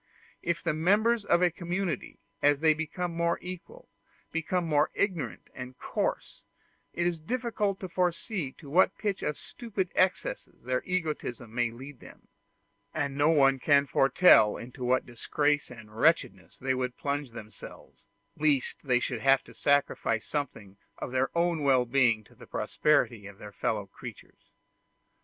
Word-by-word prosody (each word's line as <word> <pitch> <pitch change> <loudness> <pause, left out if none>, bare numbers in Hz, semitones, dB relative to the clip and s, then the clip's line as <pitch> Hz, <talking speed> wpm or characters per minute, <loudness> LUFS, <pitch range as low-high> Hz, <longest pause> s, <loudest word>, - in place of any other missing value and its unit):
If 170 -1 -2
the 165 - +1
members 210 +8 +3
of 175 - +3
a 175 - +4
community, 175 -3 -3 0.2
as 145 -1 +4
they 160 0 +5
become 165 +3 -4
more 170 0 +1
equal, 185 - -9 0.4
become 170 +2 -1
more 150 -2 +2
ignorant 170 - -2
and 125 0 -8
coarse, - - -3 0.5
it 170 - -1
is 175 -2 0
difficult 210 0 -2
to 190 - -4
foresee 180 - -1
to 150 - -15
what 175 +7 +3
pitch 205 -3 -2
of 150 - -2
stupid 200 -6 -4
excesses 185 0 -1
their 125 +1 0
egotism 150 -10 -3
may 120 -1 +1
lead 130 +3 -11
them; - - -15 0.7
and 140 -3 -1
no 145 +2 +3
one 135 -4 +4
can 140 +1 +4
foretell 135 - +5
into 125 +2 -9
what 125 +1 +2
disgrace 145 +5 0
and 110 -3 -12
wretchedness 120 - +1
they 130 0 0
would 125 -1 -3
plunge 145 -1 -2
themselves, 110 -2 -12 0.3
lest 145 -4 +1
they 125 -4 +2
should 125 -2 -3
have 135 0 +4
to - - -15
sacrifice 140 -5 +1
something 110 -9 -5 0.2
of - - -5
their 130 +1 +1
own 170 -2 +1
well 130 -3 +4
being 120 -3 +3
to - - -21
the - - -15
prosperity 120 -8 +1
of 100 -1 -12
their 105 -1 -10
fellow 105 0 -2
creatures. 95 - -12
145 Hz, 155 wpm, -29 LUFS, 125-175 Hz, 0.7 s, they